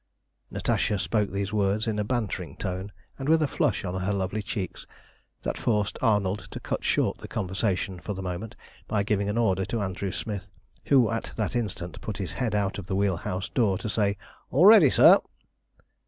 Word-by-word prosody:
Natasha 105 - 0
spoke 105 +2 0
these 100 +2 -3
words 105 +1 +1
in 110 -2 -1
a - - +1
bantering 115 -2 -3
tone, 95 +2 -4 0.3
and 135 +2 -2
with 160 0 +5
a 155 - +2
flush 120 - 0
on 90 0 -3
her 95 +3 0
lovely 100 +1 -1
cheeks, 100 -2 -5 0.6
that - - -3
forced 105 -3 0
Arnold 105 -2 +1
to - - -7
cut - - -3
short - - +1
the - - -8
conversation 95 -2 -1
for 105 +3 -5
the 95 - -5
moment, 90 +4 -5 0.3
by 105 -2 +1
giving 100 -1 0
an 105 - -1
order 95 -5 +2
to 115 - -2
Andrew 95 -1 -3
Smith, 100 -3 -5 0.4
who 125 -6 +5
at 115 - -3
that 110 +2 -2
instant 90 -8 -3
put 105 -2 -5
his 95 -5 -4
head 120 -5 -1
out 100 -1 0
of 95 - -9
the 95 - -1
wheel 100 -2 +1
house 90 +3 -3
door 105 -7 +2
to 110 - -4
say 100 -1 +1 0.3
"All 150 +8 +4
ready, 205 -9 +9
sir!" - - +7
100 Hz, 195 wpm, -27 LUFS, 95-110 Hz, 0.6 s, ready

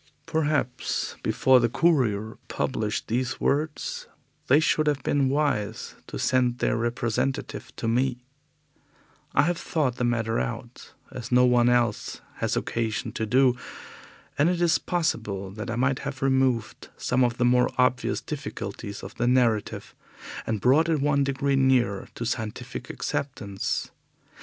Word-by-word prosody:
Perhaps 155 -6 -1
before 130 -1 +4
the 120 -1 +2
Courier 110 -8 +1
published 110 -5 -2
these 125 +3 -1
words 150 +1 -1 0.4
they 140 +3 +6 0.2
would 155 -1 0
have 145 -3 +1
been 140 -2 +2
wise 140 -7 -1
to - - -6
send 125 -1 +2
their - - +1
representative 120 +3 -2
to - - -4
me. 125 +1 0 1.1
I 145 - +6
have 175 +2 0
thought 135 -6 -1
the - - -1
matter 115 -2 0
out, 120 0 -6 0.2
as 125 -2 -7
no 125 0 +6
one 120 -1 +4
else 120 -3 +1 0.2
has - - -1
occasion 115 -2 -2
to 110 - -3
do, 125 +2 +4 0.8
and 150 +4 +5
it 180 -1 0
is 170 -1 +3
possible 110 - -2
that 110 +4 -6
I 120 - -2
might 130 +2 +1
have 140 -1 -5
removed 130 -4 +1
some 125 +1 +1
of 120 -1 +1
the 125 - +2
more 125 0 +4
obvious 125 0 +2
difficulties 115 -7 -6
of - - -8
the 120 - +1
narrative 120 -4 +1 0.5
and 110 -2 -1
brought 145 - +4
it 160 -2 +2
one 140 0 +2
degree 140 0 0
nearer 125 -7 +2
to 120 - -4
scientific 110 -2 -4
acceptance. 110 -8 -3
125 Hz, 145 wpm, -26 LUFS, 115-140 Hz, 1.1 s, they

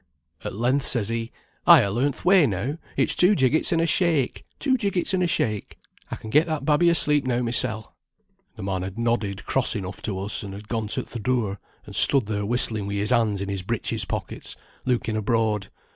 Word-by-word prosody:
At - - -6
length 125 +5 0
says 115 -4 +1
he, 115 0 -4 0.4
'I - - +8
ha 100 - -2
learnt 130 +7 -1
th' - - -13
way 180 -5 +5
now; 120 - -4 0.2
it's - - +2
two 185 +4 +5
jiggits 135 +1 +1
and 165 - +1
a 165 - +1
shake, 160 -5 0
two 265 -2 0
jiggits 200 -7 -2
and 185 - 0
a 180 - +1
shake. 110 - -2 0.3
I - - -5
can 110 - -10
get 150 +6 +3
that 155 -2 -4
babby 160 +3 +3
asleep 150 -3 +3
now 125 -1 -1
mysel.' 115 -2 -1 0.6
"The - - -9
man 95 -1 -3
had 95 +3 -7
nodded 115 -4 -2
cross 130 -2 +2
enough 95 0 -6
to 100 -4 -4
us, 100 +2 -3
and 100 -1 -8
had 105 +1 -11
gone 110 -2 -3
to - - -2
th' 115 - -9
door, 110 -5 -2 0.3
and - - -9
stood 135 -5 +9
there 105 -1 -3
whistling 110 -4 +2
wi' 100 - -4
his 100 +1 0
hands 105 -4 +1
in 100 - -5
his 100 -1 -3
breeches 110 +1 -2
pockets, - - -5 0.3
looking 120 -3 -1
abroad. 110 -2 -1
115 Hz, 210 wpm, -23 LUFS, 105-145 Hz, 0.6 s, stood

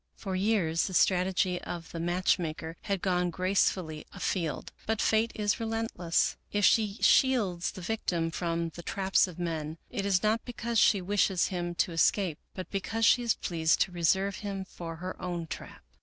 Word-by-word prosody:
For 190 -3 -4
years 185 -5 +1
the 190 - -5
strategy 185 0 +2
of 170 -2 -7
the 165 - -5
match 175 +3 +1
maker 160 -1 -4
had 200 -3 -1
gone 180 -2 +1
grace 185 +3 +2
fully 160 -5 -6
afield, 175 -4 -3 0.2
but 220 0 0
Fate 220 +1 +2
is 210 +1 0
relentless. 225 -7 0
If 205 -1 +2
she 210 -3 +3
shields 210 -10 +3
the 185 - -9
victim 170 -5 -1
from 170 0 -2
the 170 - -10
traps 190 +3 +2
of 180 - -10
men, 160 -2 -3
it 200 - -2
is 195 -2 +2
not 220 +2 +2
because 235 -2 -2
she 200 -4 +4
wishes 190 -1 +1
him 175 -2 -3
to 175 - +1
escape, 170 0 +2 0.2
but 185 - -7
because 220 +3 -1
she 245 - +5
is 235 -3 +1
pleased 160 -2 +1
to 185 - +2
reserve 190 +3 +1
him 195 -2 -4
for 165 -3 -7
her 180 +3 -5
69 185 - -6
American 175 -1 -2
Mystery 160 - -5
Stories - - -10
own - - -14
trap. - - -21
185 Hz, 195 wpm, -29 LUFS, 170-205 Hz, 0.2 s, she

